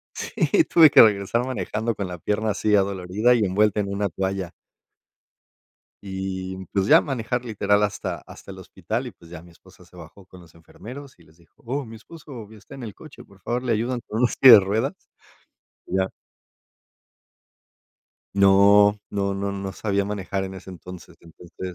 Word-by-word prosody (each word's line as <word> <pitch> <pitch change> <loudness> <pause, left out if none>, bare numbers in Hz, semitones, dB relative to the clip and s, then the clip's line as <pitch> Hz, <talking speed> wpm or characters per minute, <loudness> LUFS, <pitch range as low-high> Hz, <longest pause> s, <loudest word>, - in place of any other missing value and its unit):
Sí, 335 - 0
tuve 160 - +6
que - - +7
regresar 105 +2 +2
manejando 115 -3 -3
con 100 -1 -4
la 90 -1 -7
pierna 110 +6 -1
así 105 0 0
adolorida 100 +4 +1
y 120 - +1
envuelta 105 +2 +1
en 100 - -3
una 100 +1 -2
toalla. 95 0 -4 1.5
Y, 95 -1 -5 0.2
pues 95 -1 0
ya, - - +7
manejar 125 -2 -3
literal 100 -3 +1
hasta 105 - -4
hasta - - -13
el - - -10
hospital - - -5
y, - - -8
pues, 85 -1 -19
ya 85 - -9
mi 85 +1 -17
esposa 95 +1 -20
se 90 - -20
bajó 85 +3 -14
con 90 0 -15
los 85 -2 -18
enfermeros 125 - -12
y - - -18
les 80 0 -24
dijo: 85 -2 -27
"Oh, 135 +4 -3
mi 115 -1 -11
esposo 125 -2 -12
está 110 +5 -14
en 135 - -10
el 110 -4 -7
coche, - - -14
por 100 - -20
favor 120 +5 -3
le 125 - -3
ayudan 120 +3 -1
con 110 - -4
una 125 - +3
silla 130 -3 +8
de 100 - +8
ruedas". 110 - -2 0.9
Ya. 95 0 -1 2.2
No, 100 +1 +5
no, 100 -1 -2
no, 100 0 -3
no 95 -1 -5
sabía 100 -2 -1
manejar 95 -1 -4
en 95 0 -7
ese 95 - -11
entonces. 90 0 -12
Entonces 90 +2 -10
100 Hz, 175 wpm, -23 LUFS, 95-110 Hz, 2.2 s, silla